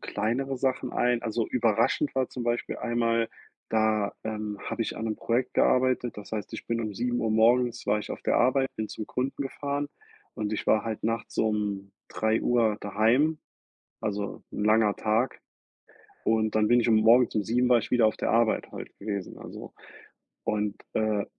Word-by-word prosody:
kleinere 130 +5 -2
Sachen 130 0 -1
ein. 120 -1 +1
Also, 115 0 -1
überraschend 115 +4 +1
war 130 -1 +1
zum 125 - -6
Beispiel 120 0 -1
einmal, 115 -1 +1 0.4
da, 110 -2 +1
ähm, 105 -2 -4
habe - - -4
ich 115 - -2
an 110 - -4
'nem 110 -1 -2
Projekt 120 +2 -1
gearbeitet. 125 -2 +2
Das 105 0 -10
heißt, 105 -3 -4
ich - - -8
bin 115 0 -1
um 110 -2 -4
7:00 120 0 -1
morgens 120 +2 +3
war 105 +1 +2
ich 105 - -7
auf - - -6
der - - +2
Arbeit, 135 +2 +3
bin 110 -1 -3
zum 110 - -6
Kunden 135 +2 -2
gefahren 140 +1 -3 0.5
und 105 0 -3
ich - - -4
war 110 -1 +3
halt 110 -2 -4
nachts 115 0 -2
um 105 -3 -1 0.2
3:00 110 0 +1
daheim, 115 +10 +2 0.6
also, 100 -1 -3
'n 105 - -2
langer 110 -1 +4
Tag. 110 +4 0 0.8
Und 110 -1 +1
dann 110 0 +3
bin 120 0 +5
ich 120 - 0
um 110 - +5
morgens 115 +3 +5
um 105 - +1
7 125 +4 +1
war 125 -1 +6
ich - - -5
wieder 120 -3 +4
auf 110 - 0
der - - -1
Arbeit 115 -1 +2
halt - - -7
gewesen, 100 -2 -4
also. - - -10 0.7
Und, 105 -1 -1 0.2
äh, 110 -2 +1
115 Hz, 180 wpm, -27 LUFS, 105-120 Hz, 0.8 s, war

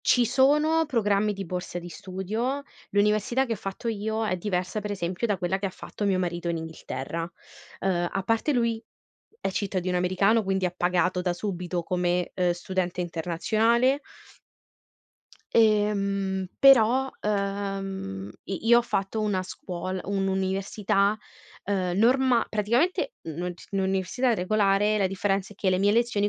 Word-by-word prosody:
ci 245 -2 +3
sono 300 +6 +3
programmi, 210 -5 +1
di 195 -2 -6
borse 180 0 -4
di 175 - -8
studio. 215 - -3 0.3
L'università 210 +6 +2
che 230 - -2
ho - - -1
fatto 195 +5 -5
io, 220 0 -1
è 185 - 0
diversa, 185 +2 -2
pre 205 0 -4
esempio, 185 +4 -2
da 205 -3 0
quella 190 +1 0
che 195 0 -1
fatto 205 - -7
mio 190 -2 +2
marito 175 -1 -2
in 165 - -1
Inghilterra. 165 +1 -5 0.5
Ehm, 175 -2 0
a 195 - -1
parte, 225 +8 +1
lui, 230 -2 0 0.6
è - - -1
cittadino 185 -2 -1
americano, 195 +5 +3
quindi, 190 -1 0
ha 180 - -4
pagato, 180 0 +1
da 180 -1 0
subito, 180 -2 -3
come, 180 0 0
ehm, 180 -1 +2
studente 180 0 -2
internazionale 220 - +1 1.5
ehm, 200 -3 +2
però, 265 0 +6
ehm, 195 - -3
i 195 +4 -4
io 235 - +8
ho 240 - +1
fatto 200 0 -2
una 200 -3 0
scuol 185 0 -5
un'università, 195 +1 0 0.5
ehm, 185 -2 -1
norma 250 +1 +4
praticamente, 245 - +1
n 160 - -4
non 175 +1 -3
c - - -15
n 195 - 0
un'università 190 +7 +1
regolare, 205 +1 +2
la 195 -2 +2
differenza 195 +1 -1
è - - -20
che, 195 - 0
le 185 0 +3
mie 200 +1 +3
lezioni, 220 -2 +2
195 Hz, 150 wpm, -26 LUFS, 180-220 Hz, 1.5 s, io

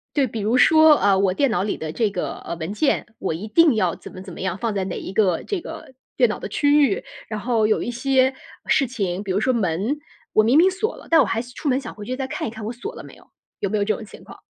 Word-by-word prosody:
对， 280 -3 +3
比 225 - -5
如 220 +5 +1
说， 315 +3 +7
呃， 195 -1 +3
我 190 -1 +2
电 275 +7 +2
脑 180 - 0
里 205 - -2
的 155 -1 -5
这 220 0 0
个， 180 - -3
呃， - - -6
文 165 +4 -4
件， 275 +7 +1
我 185 - -2
一 185 +7 -6
定 310 +3 +4
要 185 -6 +1
怎 - - -12
么 185 - -10
怎 190 -2 -10
么 - - -9
样， 185 -1 -2
放 230 0 -2
在 195 - 0
哪 185 -1 -4
一 185 - -7
个 190 -5 +2
这 400 -4 -3
个 265 - -9 0.2
电 - - +4
脑 - - -3
的 - - -7
区 290 0 +4
域。 195 - -2 0.3
然 215 -1 -3
后 230 -1 +1
有 215 0 +2
一 - - -3
些 260 +1 +2 0.3
事 275 - +3
情， 200 -6 -3
比 195 - -3
如 190 - +1
说 255 +4 +1
门， 210 - -1 0.3
我 215 - +5
明 240 +6 +4
明 355 +4 +6
锁 400 +4 -3
了， - - -14
但 325 -2 +6
我 - - +3
还 225 +2 -1
是 245 +1 -12
出 290 - -3
门 260 0 +2
想 255 -4 -8
回 210 - -9
去 255 +3 -4
再 265 -1 -3
看 - - -4
一 225 - -4
看 220 -2 -8
我 225 - -4
锁 390 - -7
了 - - -10
没 - - -13
有， - - -19 0.4
有 200 - -1
没 215 - 0
有 200 - +1
这 215 0 +1
种 - - -8
情 - - -14
况？ - - -13
220 Hz, 320 characters per minute, -22 LUFS, 195-270 Hz, 0.4 s, 说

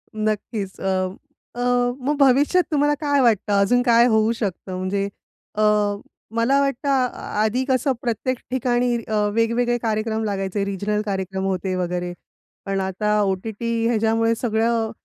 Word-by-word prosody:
नक्कीच. 215 -2 -3
अ, - - -6 0.7
अ, 245 0 +1 0.2
मग 295 - +2
भविष्यात 280 +7 +4
तुम्हाला 295 0 +3
काय 285 -1 +2
वाटतं 215 -3 +2
अजून 245 +5 +3
काय 235 -1 +5
होऊ 220 0 +3
शकतं? 190 -3 -4
म्हणजे 195 +2 -1 0.5
अ, 215 - 0 0.7
मला 260 +5 +3
वाटतं 275 0 -1
आ 250 -5 0
आधी 245 +4 +1
कसं 260 +1 +2
प्रत्येक 245 +1 -1
ठिकाणी 245 -1 +1
अ, 220 - -4 0.2
वेगवेगळे 235 +2 +1
कार्यक्रम 220 -1 -1
लागायचे, 195 -1 -2
रिजनल 205 +2 -1
कार्यक्रम 190 -1 -3
होते 190 0 -1
वगैरे. 180 0 -2 0.5
पण 195 0 -1
आता 210 +3 0
ओ-टी-टी 210 +4 -2 0.2
ह्याच्यामुळे 225 0 +2
सगळं, 225 -1 0
225 Hz, 135 wpm, -22 LUFS, 200-245 Hz, 0.7 s, काय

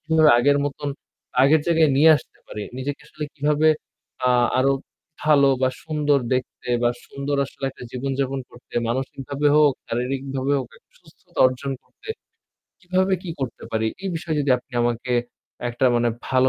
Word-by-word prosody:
কীভাবে 160 -2 +4
আগের 145 +3 +4
মতন 145 0 -3 0.5
আগের 150 +3 +5
জায়গায় 160 -3 +4
নিয়ে 155 +3 +7
আসতে - - -12
পারি? 105 - -6 0.2
নিজেকে 140 +2 -4
আসলে 150 - -6
কীভাবে 150 +2 +2 0.6
আ - - +4 0.3
আরও 135 +1 +4 0.5
ভালো 145 -2 +5
বা 130 - +4 0.2
সুন্দর 150 -2 +2 0.2
দেখতে 125 0 -4
বা 120 - +4 0.2
সুন্দর 140 +1 -3
আসলে 135 - -8
একটা - - -14
জীবনযাপন 135 +1 -2
করতে, 120 - -17
মানসিকভাবে 135 +3 -2
হোক, 150 -2 +6
শারীরিকভাবে 135 +3 -2
হোক 130 - -4
একটা - - -26
সুস্থতা - - -16
অর্জন 130 +2 -3
করতে, - - -18 0.7
কীভাবে 185 +1 +1
কি 180 - -5
করতে 125 -3 -4
পারি? 110 0 0 0.2
এই 195 - -2
বিষয়ে 160 -2 -2
যদি 140 - 0
আপনি 125 +2 -24
আমাকে 120 +1 -1 0.6
একটা 120 +2 -1
মানে 120 0 +2 0.2
ভালো 130 0 +4
140 Hz, 155 wpm, -23 LUFS, 130-150 Hz, 0.7 s, নিয়ে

